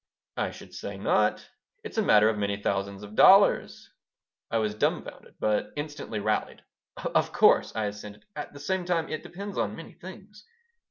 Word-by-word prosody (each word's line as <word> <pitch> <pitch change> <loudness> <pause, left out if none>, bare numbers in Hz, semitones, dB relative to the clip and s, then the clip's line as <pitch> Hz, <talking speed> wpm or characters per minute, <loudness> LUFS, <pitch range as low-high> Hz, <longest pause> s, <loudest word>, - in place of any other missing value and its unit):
"I - - -1
should - - -12
say - - -6
not. - - +1 0.4
It's 440 - -4
a - - +4
matter 105 - +5
of 110 - +2
many 100 -1 -2
thousands 100 0 -2
of 105 0 -10
dollars." 195 - +5 0.6
I 115 - 0
was 105 -2 0
dumfounded, 105 - -3
but 105 -1 0
instantly 145 -7 -5
rallied. 105 +1 -2 0.3
"Of - - 0
course," - - +4
I 110 -1 0
assented. 105 0 -8
"At 150 - -6
the 145 - -12
same 185 +5 -1
time 175 -2 -1
it 155 - -4
depends 200 +1 -7
on 105 -2 -1
many 165 - -10
things." 200 +3 -12
115 Hz, 170 wpm, -27 LUFS, -, 0.6 s, matter